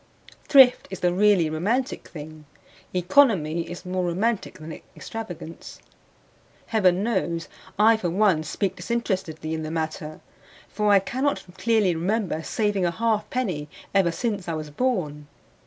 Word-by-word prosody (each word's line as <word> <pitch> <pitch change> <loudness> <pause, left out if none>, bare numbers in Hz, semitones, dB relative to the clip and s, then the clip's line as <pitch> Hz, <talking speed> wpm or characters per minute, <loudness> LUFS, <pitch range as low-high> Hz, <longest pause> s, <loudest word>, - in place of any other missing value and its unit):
Thrift 265 -3 +6
is 190 - -7
the 175 -1 +2
really 195 -3 +4
romantic 215 - -1
thing; 155 -1 -10 0.5
economy 180 - +3
is 175 +1 -8
more 185 0 -1
romantic 195 +6 -1
than 155 +1 -9
extravagance. 180 -7 -8 0.9
Heaven 190 -4 +2
knows 175 -7 -1 0.3
I 220 +2 +5
for 180 -5 -2
one 185 -2 +3
speak 190 +5 -2
disinterestedly 185 -9 -2
in 160 - -3
the 155 - -4
matter; 160 -1 -4 0.5
for 210 +1 +1
I 200 - +7
cannot 260 +9 -1
clearly 220 -5 +2
remember 180 0 -1
saving 205 +2 0
a 175 - +3
half 220 +4 0
penny 180 -13 -2 0.2
ever 190 -4 +3
since 205 -1 -3
I 165 - -2
was 155 -1 -6
born. 150 - -1
185 Hz, 140 wpm, -25 LUFS, 160-220 Hz, 0.9 s, I